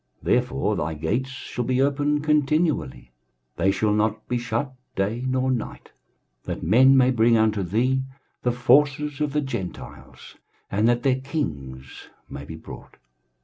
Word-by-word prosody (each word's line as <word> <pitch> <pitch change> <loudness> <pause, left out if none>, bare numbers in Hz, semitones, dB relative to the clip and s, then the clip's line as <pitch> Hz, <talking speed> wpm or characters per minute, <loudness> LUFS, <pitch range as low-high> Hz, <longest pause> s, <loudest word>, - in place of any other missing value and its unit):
23:060:011 - - -1
Therefore 125 -4 0
thy 80 - -2
gates 105 - -2
shall 130 -2 -5
be 130 +1 0
open 145 +2 +1
continually; 150 - 0 0.5
they 95 +3 +2
shall 105 +2 +1
not 110 +1 0
be 125 - -1
shut 120 +3 -3 0.2
day 105 +6 -1
nor 130 0 +1
night; 120 -4 -5 0.5
that - - -5
men 130 +9 +5
may 130 0 +5
bring 115 -1 +4
unto 110 -2 +2
thee 120 +9 +1 0.4
the 125 - +1
forces 145 +3 +2
of 150 -1 0
the 150 +1 0
Gentiles, 100 -10 -8 0.3
and 105 +3 +2
that 120 0 +1
their 130 -1 +2
kings 70 - -6 0.2
may 70 - -8
be 80 - -8
brought. 80 - -12
125 Hz, 150 wpm, -24 LUFS, 105-135 Hz, 0.5 s, men